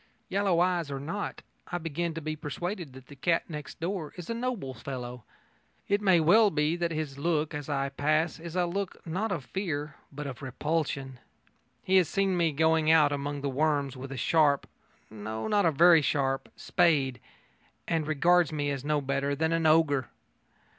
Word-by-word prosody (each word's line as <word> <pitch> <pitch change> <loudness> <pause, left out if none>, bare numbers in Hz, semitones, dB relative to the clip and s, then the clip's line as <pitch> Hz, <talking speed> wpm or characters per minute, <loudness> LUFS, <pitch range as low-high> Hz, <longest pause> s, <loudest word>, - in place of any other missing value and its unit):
Yellow 195 -3 +2
eyes 175 -4 +1
or 140 -1 -4
not, 170 +9 -5 0.3
I 175 - 0
begin 165 0 -3
to 165 - -4
be 155 0 -3
persuaded 170 +1 -5
that 130 0 -12
the 145 - -13
cat 165 +5 0
next 150 -4 -8
door 170 -2 -3
is 180 +4 -6
a - - 0
noble 230 - -3
fellow. 125 -3 -7 0.6
It 200 +1 +1
may 190 -4 +5
well 205 +7 +6
be 150 -1 +1
that 175 -1 -1
his 155 -4 -4
look 155 0 0
as 145 -1 -5
I 140 -1 0
pass 155 +4 0
is 170 +1 -8
a 180 -1 +2
look 190 +2 -4
not 190 +6 -2
of 155 -9 -3
fear 155 -6 -4
but 145 +1 -6
of 135 -2 -6
repulsion. 135 -1 -2 0.6
He 190 0 +3
has 180 -5 +3
seen 195 -1 +1
me 170 -2 +2
going 160 +1 +2
out 155 -3 +6
among 145 0 -3
the 140 - -2
worms 140 -1 0
with 130 +1 -8
a 135 - -5
sharp 145 +1 +3 0.5
no, 110 +1 -5
not 205 -4 +3
a - - +3
very 165 +2 +6
sharp 135 -2 0
spade, 135 -7 +2 0.7
and 160 -2 0
regards 170 +3 +3
me 145 -2 -1
as 135 -2 -4
no 150 0 +1
better 140 +1 -1
than 160 +3 0
an 165 -1 +2
ogre. 155 -5 +3
155 Hz, 185 wpm, -29 LUFS, 140-175 Hz, 0.7 s, well